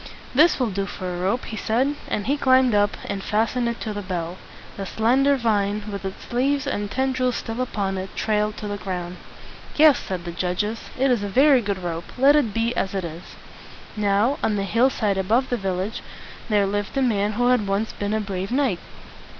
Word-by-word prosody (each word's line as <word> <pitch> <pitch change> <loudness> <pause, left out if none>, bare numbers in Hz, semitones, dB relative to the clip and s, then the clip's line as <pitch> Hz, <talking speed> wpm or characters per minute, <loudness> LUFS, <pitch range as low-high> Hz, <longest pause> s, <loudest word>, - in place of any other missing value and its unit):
"This 305 +5 +5
will 245 -4 0
do 195 +1 -2
for 185 -2 -5
a 175 - -5
rope," 200 +7 0
he 220 - -6
said; 240 +7 +1
and 205 - -2
he 280 - +2
climbed 260 -3 +4
up, 205 0 +2
and 200 -1 -3
fastened 230 +3 0
it 235 - -4
to 215 - -3
the 205 - -4
bell. 180 -2 -4 0.4
The 195 -1 -5
slender 260 +8 +3
vine, 210 -3 0
with 200 0 -5
its 190 +5 -7
leaves 275 +3 +1
and 205 -7 -2
ten 265 +4 0
drils 255 -1 0
still 225 +2 -4
upon 195 -6 -2
it, 190 +1 -7
trailed 210 -1 0
to 210 - -5
the 205 0 -3
ground. 180 -2 -4 0.6
"Yes," 300 -3 +6
said 180 -2 -5
the 170 - -4
judges, 185 +6 -2
"it 265 +1 +3
is 240 -4 +2
a 205 - -3
very 270 +4 +5
good 200 -3 -2
rope. 170 -1 -5
Let 275 +3 +6
it 275 -8 +2
be 230 +3 0
as 195 0 -1
it 190 - -1
is." 165 +1 -9 0.6
Now, 210 +7 +2
on 215 - +1
the 200 - -1
hill 230 +6 +3
side 205 -6 0
above 230 +8 +1
the - - +3
village, 195 +1 -3 0.5
there 205 -2 +3
lived 205 +5 -2
a 270 - +3
man 210 -4 +1
who 245 +3 +2
had 245 -5 +2
once 200 +3 -1
been 205 +1 -2
a - - +1
brave 195 -1 -4
knight. 255 -9 +1
210 Hz, 215 wpm, -23 LUFS, 195-250 Hz, 0.6 s, Yes